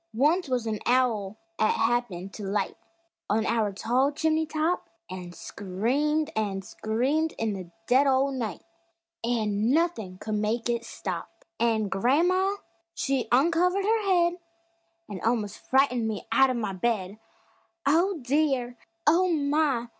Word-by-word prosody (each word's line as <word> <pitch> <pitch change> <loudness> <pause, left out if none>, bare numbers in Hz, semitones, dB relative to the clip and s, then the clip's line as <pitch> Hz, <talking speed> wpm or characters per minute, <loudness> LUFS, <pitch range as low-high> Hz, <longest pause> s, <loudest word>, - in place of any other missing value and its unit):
Once 300 +6 +2
wuz 250 -2 0
a 215 -2 -2
owl 225 -5 +1 0.2
'at 215 - +3
happened 225 -5 -1
to 210 - -7
light 200 +1 -1 0.5
On 215 +1 +1
our 225 -3 +1
tall 245 +8 +1
chimney 315 +1 +1
top, 315 +3 -1 0.2
An' 180 -1 -7
screamed 250 - -1
an' 200 -3 -1
screamed 260 +12 -1
in 225 -2 -1
the 185 -3 -7 0.2
dead 265 +4 +4
o' 270 +1 +3
night, 235 -7 -4 0.6
An' 220 -2 0
nuthin' 265 - 0
could 215 +3 -5
make 215 +3 -1
it 235 -1 -2
stop! - - -6
An' 220 -3 +2
gran'ma 340 - +2 0.4
she 270 -3 -1
uncovered 340 +8 +3
her 445 +1 +2
head 355 -3 +2 0.7
An' 195 -3 -7
almos' 220 -3 0
frightened 255 -4 +2
me 215 -2 -4
out 270 0 +5
of 255 - -1
the 210 -4 -2
bed; 200 0 -1 0.7
"Oh, 340 +6 +3
dear; 260 -3 0 0.3
Oh, 345 +5 +4
my! 285 -5 +1
245 Hz, 140 wpm, -27 LUFS, 215-300 Hz, 0.7 s, out